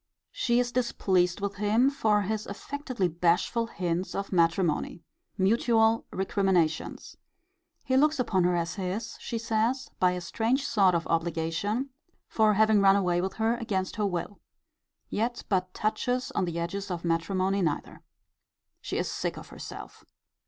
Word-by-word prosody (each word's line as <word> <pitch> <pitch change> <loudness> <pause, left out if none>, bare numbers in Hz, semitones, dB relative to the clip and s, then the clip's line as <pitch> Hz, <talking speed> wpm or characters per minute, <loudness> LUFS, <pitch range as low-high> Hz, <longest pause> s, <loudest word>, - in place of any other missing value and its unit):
She 235 0 +1
is 245 -1 0
displeased 190 -7 +1
with 200 -1 -3
him 220 +6 +3
for 215 -7 +2
his 215 +2 -3
affectedly 255 - -3
bashful 175 +7 +1
hints 180 -3 -3
of 195 0 -3
matrimony. 170 -1 +1 0.3
Mutual 225 +2 +3
recriminations. 190 -4 0 0.7
He 260 - 0
looks 305 +3 +4
upon 195 -7 +2
her 180 0 +2
as 170 -1 -1
his, 205 +5 -4
she 235 - -4
says, 230 +3 -1
by 180 -1 +3
a 180 - -4
strange 230 +10 0
sort 195 -8 +3
of 170 - -1
obligation, 165 - -1 0.4
for 215 -2 +3
having 215 0 +4
run 195 0 +6
away 180 -3 +1
with 190 +1 -2
her 225 +1 +1
against 200 -4 -2
her 210 - +1
will. 180 +2 -4 0.7
Yet 240 +3 -2
but 185 -2 0
touches 245 +5 -1
on - - 0
the 170 -1 -4
edges 195 +4 -3
of 175 -1 -4
matrimony 185 +4 0
neither. 155 -5 -2 0.8
She - - -4
is - - -1
sick - - -3
of - - -10
herself. - - -9
200 Hz, 150 wpm, -28 LUFS, 180-230 Hz, 0.8 s, run